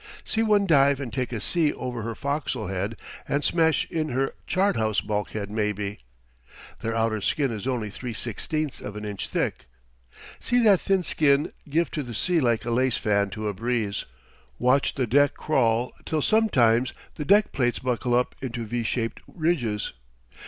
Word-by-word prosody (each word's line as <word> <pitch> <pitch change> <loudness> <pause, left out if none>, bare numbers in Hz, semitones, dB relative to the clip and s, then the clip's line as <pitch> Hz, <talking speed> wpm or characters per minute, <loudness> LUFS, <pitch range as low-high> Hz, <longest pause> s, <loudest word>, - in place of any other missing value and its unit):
See 225 - 0
one 210 -2 +3
dive 140 -5 +4
and 125 -6 -5
take 125 0 -2
a 115 - -2
sea 160 - +1
over 125 -2 -4
her 115 +1 -4
fo'c's'le 140 - -2
head 100 +4 -2 0.3
and 145 +1 0
smash 160 -2 +3
in 155 -1 -1
her 135 +2 0
chart 195 -2 +2
house 110 -2 +1
bulkhead 105 -1 -3
maybe! 105 -1 -2 0.8
Their 115 0 -2
outer 110 -2 +1
skin 140 - +1
is 110 +2 -5
only 115 -5 -1
3/16 125 +6 -4
of 105 - -7
an 105 0 -5
inch 100 -2 -4
thick. - - -2 0.7
See 245 -1 +2
that 200 -5 +5
thin 195 -2 +2
skin 145 -3 +2 0.2
give 165 +4 +1
to 150 - -2
the 120 -4 -7
sea 175 +9 +2
like 120 -6 +1
a 120 - -1
lace 125 0 +2
fan 100 -1 +1
to 105 +2 -4
a 105 - -1
breeze! 115 -1 -1 0.5
Watch 130 +3 +2
the 130 - +1
deck 145 +5 +3
crawl 120 -5 +1
till 155 -2 -1
sometimes 130 - +3 0.2
the 150 - -4
deck 205 +8 +4
plates 120 -3 +1
buckle 125 -1 0
up 125 0 +1
into 120 -3 -4
V 120 +2 -2
shaped 115 0 -2
ridges! 145 -11 -1
125 Hz, 175 wpm, -25 LUFS, 110-150 Hz, 0.8 s, that